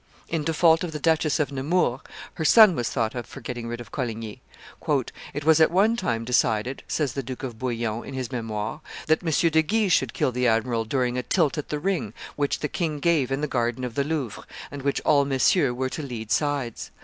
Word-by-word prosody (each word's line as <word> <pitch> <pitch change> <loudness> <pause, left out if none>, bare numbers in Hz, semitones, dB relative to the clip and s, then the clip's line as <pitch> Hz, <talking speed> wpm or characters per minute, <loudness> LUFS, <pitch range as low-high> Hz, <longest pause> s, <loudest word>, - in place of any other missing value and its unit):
In 165 -2 -1
default 165 +1 +3
of 170 -3 -4
the 150 - -4
Duchess 160 -2 +2
of 145 -1 0
Nemours, 135 -1 0 0.3
her 160 - -4
son 215 +4 +8
was 120 -4 -1
thought 115 -4 -1
of 120 -2 -5
for - - -10
getting 120 -1 -6
rid 120 0 -5
of 120 - -10
Coligny. 115 -5 -4 0.9
"It 145 - -4
was 160 0 +5
at 160 - +6
one 205 +6 +3
time 115 - -2
decided," 120 +1 +1
says 150 -5 -1
the 135 - -2
Duke 130 0 -7
de 130 -3 -4
Bouillon 115 -1 -3
in 135 - -8
his 130 -1 -4
Memoires, 110 +1 -4 0.3
"that 160 0 +2
M. 165 - -1 0.2
de 160 +1 +4
Guise 205 +2 +1
should 130 -3 +1
kill - - +1
the 125 0 +1
admiral 115 0 +1
during 125 +1 0
a - - -1
tilt 155 +2 +1
at 150 - -6
the 150 - -1
ring 190 +4 -2 0.2
which 145 -1 -1
the 150 - 0
king 155 -2 -2
gave 145 -5 +2
in 135 +2 -1
the 150 - 0
garden 120 -1 -1
of 125 -2 -4
the 140 - 0
Louvre, 140 -7 -3 0.3
and 140 - -6
in - - -12
which 140 - 0
all 145 -1 +4
Messieurs 135 +1 +2
were 130 +1 -2
to 155 - -5
lead 115 -6 -6
sides. 145 -6 -1
135 Hz, 225 wpm, -25 LUFS, 120-155 Hz, 0.9 s, son